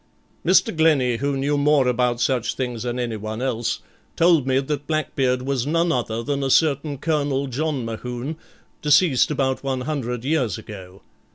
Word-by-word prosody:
Mr. 180 0 +3
Glennie, 145 -7 +3
who 140 +2 -1
knew 145 +2 0
more 145 -2 +3
about 125 -1 +1
such 125 -1 0
things 125 -3 -3
than 120 0 -3
anyone 110 -3 -4
else, 120 -3 -2 0.3
told 165 -5 +4
me 130 0 +2
that 145 +1 -2
Blackbeard 135 -5 0
was 135 -1 -1
none 165 +2 +2
other 115 -4 -2
than 140 +2 -2
a 135 - 0
certain 145 0 +2
Colonel 145 -2 0
John 140 0 -2
Mohune, 125 +6 -5 0.5
deceased 150 -2 +4
about 135 -3 -1
one 135 -2 -2
hundred 125 -4 -3
years 135 - 0
ago. 95 -2 -11
135 Hz, 160 wpm, -22 LUFS, 125-150 Hz, 0.5 s, told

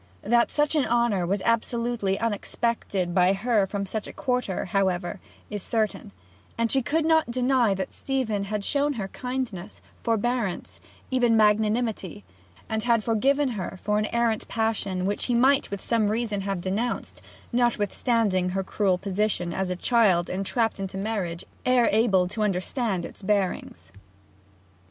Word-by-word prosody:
That 235 +3 +3
such 295 +1 +1
honour 235 - +2
was 195 +1 -1
absolutely 230 -3 0
unexpected 205 -4 -1
by 185 +1 +4
her 205 0 +1
from 200 0 -3
such 215 +2 -4
a - - -9
quarter 250 -7 -1
is, - - -9
however, 185 -1 0 0.4
certain; 215 - -2 0.5
and 230 -1 +1
she 270 - +4
could 310 +5 0
not 320 -4 +3
deny 250 -3 +2
that 190 - -4
Stephen 230 -7 -1
had 210 0 -3
shown 290 +1 +1
her 200 -6 -4
kindness, 245 -7 -5 0.2
forbearance, 220 - -1 0.3
even 240 -3 +3
magnanimity; 215 - +1 0.4
had 220 0 +1
forgiven 270 +6 +2
her 195 -4 -5
for 210 +2 0
an 215 - 0
errant 235 -2 0
passion 205 -5 -1
which 205 +1 -1
he 245 - +1
might 265 +4 +4
with 200 -1 -5
some 225 -3 +2
reason 215 -2 -1
have 195 -2 -3
denounced, 200 +7 -3 0.3
notwithstanding 225 -4 +1
her 195 +1 -1
cruel 190 -1 +1
position 195 -2 -1
as 190 +1 -2
a 180 - -1
child 190 -5 +3
entrapped 200 +4 -1
into 195 0 -4
marriage 195 -5 -3 0.2
ere 255 -2 +4
able 200 -5 +3
to 210 +4 -4
understand 195 -1 -1
its - - -11
bearings. 200 -2 -2
215 Hz, 145 wpm, -26 LUFS, 195-240 Hz, 0.5 s, by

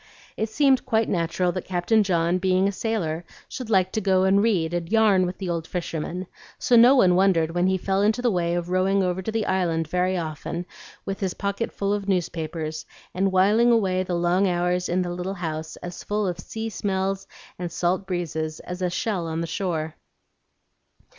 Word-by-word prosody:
It 220 - -2
seemed 270 +2 +3
quite 220 -2 +2
natural 175 0 0
that 185 0 -4
Captain 185 +5 +2
John, 175 -2 +1
being 185 +1 +2
a - - +1
sailor, 185 -6 -2 0.2
should 250 -4 -7
like 190 -3 +3
to 220 - -1
go 190 -2 +3
and 195 +1 +4
read 180 -7 +1
and 170 0 -3
"yarn" 210 -5 +4
with 180 - -5
the 190 - -5
old 165 -2 -2
fisherman; 175 +1 -4 0.3
so 255 -5 +2
no 240 +4 +8
one 185 -9 +5
wondered 180 -4 +3
when 175 +2 +1
he 190 0 +2
fell 195 +1 0
into 215 +3 +2
the 245 -1 +2
way 170 -2 0
of 175 0 -3
rowing 190 +1 +2
over 180 0 -1
to 220 - -3
the 220 -1 -1
Island 165 -4 0
very 180 +2 0
often 165 +1 -4 0.4
with 195 0 -4
his 190 -3 -2
pocket 200 +3 -2
full 200 0 -1
of 205 -1 -3
newspapers, 160 -3 -2 0.3
and 195 +1 +1
whiling 205 +6 +4
away 190 -5 +2
the 180 -1 -2
long 175 +3 +2
hours 180 0 0
in 180 +1 +1
the 175 -1 -4
little 180 +2 -4
house 160 -3 -4
as 175 0 -7
full 210 0 -1
of 175 -2 -2
sea 225 +6 -5
smells 195 -1 -2 0.3
and 175 -1 -4
salt 180 +3 -1
breezes 160 -4 -3
as 180 +1 -7
a 180 - +1
shell 180 -2 -2
on 160 0 -3
the 170 - -1
shore. 160 -2 -2
185 Hz, 200 wpm, -24 LUFS, 175-200 Hz, 0.4 s, no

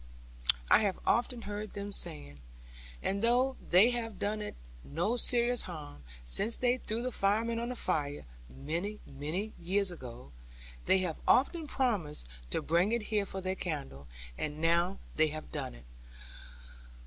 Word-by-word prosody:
I - - +9
have 200 -3 +1
often 240 0 +1
heard 205 +1 -5
them 200 0 -4
saying. 70 - -4 0.6
And 200 +1 0
though 250 +3 +3
they 200 +7 +7
have 225 -4 -3
done 210 +2 -1
it 210 - -5 0.3
no 70 - 0
serious 245 0 +4
harm, 150 - -8 0.2
since 135 - +2
they 250 0 +3
threw 230 -1 -3
the 255 - -1
firemen 225 +3 +1
on 235 +1 -2
the 250 - -3
fire, 145 - -1 0.2
many, 170 - -3
many 155 +10 -3
years 195 +2 +2
ago, 120 - -9 0.6
they 190 - +6
have 165 -3 -3
often 310 +4 +4
promised 205 - 0 0.2
to - - -1
bring 175 +6 +3
it 235 -1 +1
here 205 -2 +2
for 190 - -4
their 185 0 -1
candle; 140 - -5 0.3
and 150 0 -3
now 170 +4 +2 0.2
they 155 0 +5
have 155 0 -6
done - - -4
it. - - -14
195 Hz, 155 wpm, -32 LUFS, 155-230 Hz, 0.6 s, I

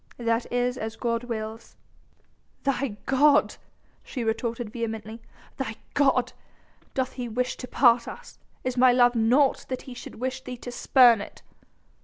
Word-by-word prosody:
"That 230 0 -1
is 245 +1 0
as 220 +1 -4
God 230 0 -2
wills...!" 220 -1 -6 0.9
"Thy 275 -5 -1
god!" 285 +2 +4 0.5
she 250 - -5
retorted 230 0 -2
vehemently, 225 -1 -5 0.4
"thy 255 -5 -3 0.2
god! 270 -3 +2 0.6
Doth 260 -1 0
he 245 -2 -5
wish 250 +3 -1
to 250 - -7
part 240 -3 +4
us? - - -10 0.2
Is 255 -1 -2
my 255 0 +6
love 245 0 +5
naught 250 +4 +2
that 255 -1 -4
he 260 - -9
should 245 - -10
wish 260 +2 -3
thee 250 - -7
to 245 - -8
spurn 240 -3 +5
it...?" - - -10
245 Hz, 150 wpm, -26 LUFS, 230-255 Hz, 0.9 s, my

